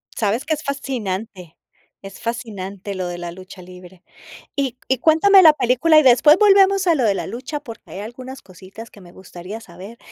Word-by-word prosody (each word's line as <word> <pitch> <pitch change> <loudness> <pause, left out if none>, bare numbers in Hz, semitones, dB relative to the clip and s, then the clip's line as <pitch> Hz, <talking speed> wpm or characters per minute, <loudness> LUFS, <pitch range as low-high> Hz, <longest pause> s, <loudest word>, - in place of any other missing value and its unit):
Sabes 220 +3 -1
que 315 - -1
es 305 - -5
fascinante 215 - -5 0.5
es 195 0 -12
fascinante 200 -4 -6
lo 185 -1 -4
de 175 - -6
la 175 0 -7
lucha 185 +1 -13
libre. 180 0 -15 0.5
Y 270 -3 -3
y 265 - +2
cuéntame 325 - +5
la 315 -4 +7
película, 265 +5 +2
y 310 - +6
después 280 +6 +5
volvemos 390 -2 +4
a 335 - +4
lo 255 - 0
de 205 - +2
la - - -5
lucha, 255 +7 -7
porque 230 -2 -13
hay 195 - -8
algunas 255 +4 -10
cositas 190 +5 -14
que 205 - -17
me 175 -2 -16
gustaría 190 +3 -10
saber, 195 +3 -13
225 Hz, 190 wpm, -19 LUFS, 190-280 Hz, 0.5 s, la